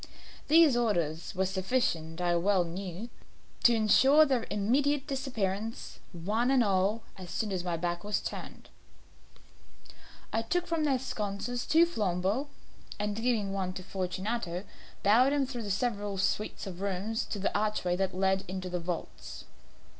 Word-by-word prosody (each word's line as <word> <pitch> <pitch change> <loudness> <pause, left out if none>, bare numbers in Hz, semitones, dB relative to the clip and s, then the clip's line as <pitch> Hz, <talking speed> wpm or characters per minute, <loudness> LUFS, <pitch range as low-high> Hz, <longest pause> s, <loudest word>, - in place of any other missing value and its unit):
These 315 -3 +6
orders 175 -9 0
were 190 +1 +1
sufficient, 185 -4 -1
I 175 -1 +2
well 185 +1 +3
knew, 185 +5 -6 0.5
to 235 - +6
insure 265 +8 +6
their 260 -5 0
immediate 270 +7 +1
disappearance, 225 -6 -3
one 210 +8 0
and 265 -2 +4
all, 200 +2 +1 0.2
as 180 -2 -8
soon 215 +3 -2
as 185 -2 -2
my 175 -2 -1
back 175 +1 -2
was 205 -1 0
turned. - - -7 1.6
I 225 - +2
took 350 +10 -1
from 330 -3 0
their 275 -3 +3
sconces 240 0 -3
two 330 +2 +6
flambeaux, 205 - -1 0.5
and 210 0 -2
giving 225 -4 0
one 190 -2 -2
to 185 - -7
Fortunato, 185 0 -3 0.4
bowed 245 +7 +5
him 285 -2 +2
through 240 -5 -5
several 205 -1 -1
suites 195 +3 -1
of 185 -2 -7
rooms 200 +3 -1
to - - -5
the 200 - -1
archway 205 -4 +1
that 190 0 -1
led 190 0 +2
into 185 0 -5
the 180 - -1
vaults. 170 0 -6
205 Hz, 145 wpm, -30 LUFS, 185-240 Hz, 1.6 s, These